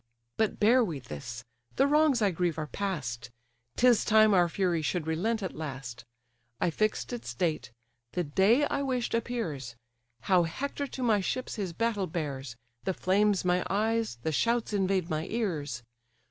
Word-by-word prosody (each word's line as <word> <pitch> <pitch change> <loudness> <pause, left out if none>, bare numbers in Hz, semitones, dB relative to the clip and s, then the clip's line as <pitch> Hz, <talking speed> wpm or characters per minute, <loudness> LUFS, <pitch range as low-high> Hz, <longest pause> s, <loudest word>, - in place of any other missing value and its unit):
But 220 -2 0
bear 240 +4 +5
we 170 -9 -3
this—the 120 - -4
wrongs 290 -4 +3
I 200 - +3
grieve 175 -2 -1
are 155 - -2
past; 145 -11 -4 0.5
'Tis 245 -3 +4
time 215 -1 +5
our 175 -2 +4
fury 175 -2 0
should 155 +1 -1
relent 200 +8 -1
at 190 - -4
last: 130 -6 -6 0.5
I 170 - +1
fix'd 155 - -1
its 120 0 -5
date; 155 -4 -1 0.4
the 180 - 0
day 195 - +3
I 280 - -1
wish'd 255 -3 -1
appears: 175 - -3 0.5
How 180 +8 +4
Hector 280 - -3
to 260 - -5
my 220 -4 +3
ships 255 +7 -3
his 195 -5 -3
battle 210 -1 0
bears, 140 -7 -4 0.3
The 190 - -1
flames 200 +1 +2
my 180 0 +2
eyes, 220 - 0
the 160 - 0
shouts 230 +7 +1
invade 190 -3 +1
my 155 +1 -2
ears. 155 - -2
185 Hz, 160 wpm, -29 LUFS, 150-220 Hz, 0.5 s, bear